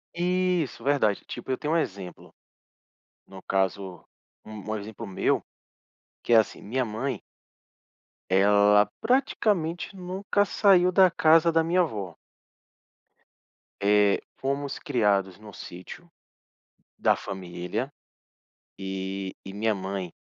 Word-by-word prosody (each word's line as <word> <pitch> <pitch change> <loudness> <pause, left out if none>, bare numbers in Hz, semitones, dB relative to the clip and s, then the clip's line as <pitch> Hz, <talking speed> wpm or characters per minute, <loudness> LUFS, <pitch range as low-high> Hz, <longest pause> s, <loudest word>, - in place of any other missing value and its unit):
Isso, 180 -5 0
verdade. 135 -8 +1
Tipo, - - -8
eu 130 - 0
tenho 150 +2 -2
um - - +3
exemplo, 95 - -5 0.9
no 95 -1 -12
caso, 95 -2 -2 0.4
u - - -12
um 110 0 -5
exemplo 110 +2 -7
meu, 95 - 0 0.8
que 120 - +1
é - - +8
assim, 110 - +1
minha 125 +5 -1
mãe 115 +2 -3 1.1
ela 105 +2 +5
praticamente 210 - 0
nunca 190 +2 -1
saiu 185 -3 +4
da 185 -1 +6
casa 165 +1 +4
da 165 0 +3
minha 175 +2 +2
vó. 100 - -5 1.7
Eh, 105 0 +4 0.2
fomos 140 +1 -3
criados 100 -5 +1
no 105 -1 -12
sítio 90 - -10 0.9
da - - +3
família, 95 +6 -5 0.9
e 95 0 -4
e 95 - -8
minha 110 +2 0
mãe, 95 -2 -4
110 Hz, 115 wpm, -26 LUFS, 95-165 Hz, 1.7 s, é